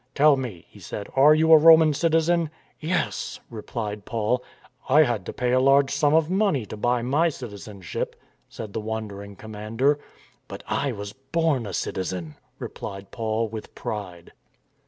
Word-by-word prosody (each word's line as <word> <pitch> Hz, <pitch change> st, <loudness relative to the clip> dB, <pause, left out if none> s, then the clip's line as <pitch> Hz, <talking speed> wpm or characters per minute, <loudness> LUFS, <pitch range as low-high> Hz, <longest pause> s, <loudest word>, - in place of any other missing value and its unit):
"Tell 150 Hz, 0 st, +6 dB
me," 120 Hz, -11 st, -6 dB
he -, -, -17 dB
said, 100 Hz, -, -7 dB
"are 145 Hz, +3 st, +7 dB
you 160 Hz, +1 st, +3 dB
a 160 Hz, -, +10 dB
Roman 160 Hz, -1 st, +7 dB
citizen?" 165 Hz, +1 st, +2 dB, 0.2 s
" -, -, -34 dB
Yes," 170 Hz, +3 st, -2 dB
replied 105 Hz, -2 st, -5 dB
Paul. 115 Hz, +3 st, -1 dB, 0.2 s
" 125 Hz, -, -28 dB
I 150 Hz, +4 st, +7 dB
had 120 Hz, -9 st, -2 dB
to -, -, -3 dB
pay 125 Hz, -1 st, -1 dB
a 130 Hz, -, +4 dB
large 135 Hz, +1 st, +4 dB
sum 145 Hz, +1 st, +2 dB
of 160 Hz, -1 st, +3 dB
money 185 Hz, -, +1 dB
to 110 Hz, -, -8 dB
buy 120 Hz, +2 st, 0 dB
my 150 Hz, +7 st, +2 dB
citizenship," 105 Hz, -, -6 dB, 0.3 s
said 105 Hz, -3 st, -8 dB
the 110 Hz, -, -3 dB
wondering 105 Hz, -2 st, -6 dB
commander. 110 Hz, +7 st, -1 dB, 0.2 s
" -, -, -32 dB
But -, -, -9 dB
I 140 Hz, -, 0 dB
was 100 Hz, -2 st, -6 dB
born 135 Hz, -2 st, -1 dB
a 95 Hz, -, -6 dB
citizen," 90 Hz, -5 st, -3 dB, 0.2 s
replied 100 Hz, 0 st, -7 dB
Paul 110 Hz, 0 st, -1 dB
with 110 Hz, 0 st, -8 dB
pride. 90 Hz, -5 st, -6 dB
125 Hz, 170 wpm, -25 LUFS, 105-150 Hz, 0.3 s, a